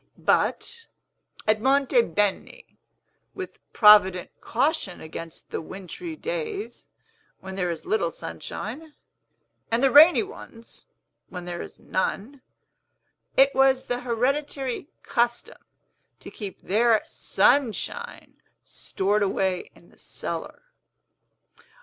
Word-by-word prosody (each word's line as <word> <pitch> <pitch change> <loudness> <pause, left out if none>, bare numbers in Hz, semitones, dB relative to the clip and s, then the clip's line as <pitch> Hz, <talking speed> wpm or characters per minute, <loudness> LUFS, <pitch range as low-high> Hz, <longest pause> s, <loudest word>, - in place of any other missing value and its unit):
But, 465 -1 0 0.6
at 215 0 +3
Monte 265 -1 +3
Beni, 205 -1 -2 0.6
with 375 -1 -7
provident 205 -4 +6
caution 265 - -1
against 160 +1 -9
the - - -3
wintry 195 - -8
days, 450 0 -5 0.5
when 190 0 -8
there 180 -2 -1
is 170 - -5
little 430 +3 +1
sunshine, 310 +1 -7 0.7
and 230 +3 +1
the 270 - +4
rainy 315 - +8
ones, 235 - -12 0.4
when 180 -2 -7
there 175 -1 -5
is - - -10
none, 230 +8 -3 1.0
it 270 +1 +6
was 265 -1 +3
the 245 0 -2
hereditary 260 +2 -2 0.2
custom 240 - -1 0.6
to - - -11
keep 205 -3 -8
their 225 +2 +3
Sunshine 285 - 0 0.2
stored 205 +2 -2
away 190 -2 0
in - - -20
the - - -23
cellar. - - -6
240 Hz, 105 wpm, -25 LUFS, 195-295 Hz, 1.0 s, rainy